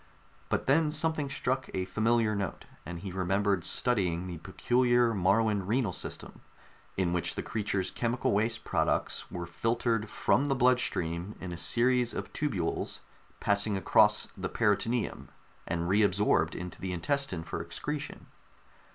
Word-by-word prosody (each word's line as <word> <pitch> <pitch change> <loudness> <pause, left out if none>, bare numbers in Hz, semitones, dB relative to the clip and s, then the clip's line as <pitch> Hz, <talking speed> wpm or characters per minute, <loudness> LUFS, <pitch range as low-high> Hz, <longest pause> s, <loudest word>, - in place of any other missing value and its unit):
But - - 0
then 150 +3 +4
something 155 -1 0
struck 130 -1 -1
a 95 -1 -1
familiar 110 +2 +1
note, 100 -5 -4 0.2
and 85 0 -5
he 95 -1 -5
remembered 95 +1 +1
studying 90 -8 +1
the 90 -3 -6
peculiar 120 +6 +2
Moruan 100 +1 +2
renal 110 -3 +1
system, - - -6 0.6
in 90 -2 +1
which 90 -2 -1
the - - -3
creature's 100 -4 -1
chemical 120 +1 0
waste 110 +3 0
products - - 0
were 85 -1 -5
filtered 115 +4 -1
from 135 - +2
the 140 -1 +1
bloodstream 105 -8 +1
in 95 - -6
a - - -4
series 120 +7 +2
of - - -5
tubules 100 - -2 0.4
passing 100 0 +1
across 95 - +4
the - - -4
peritoneum, 110 +2 0 0.4
and 85 0 -1
re 100 +4 +3
absorbed 100 0 +2
into 90 0 -7
the 95 -1 -3
intestine 115 - -1
for - - -4
excretion. 150 -1 -5
105 Hz, 145 wpm, -30 LUFS, 90-120 Hz, 0.6 s, then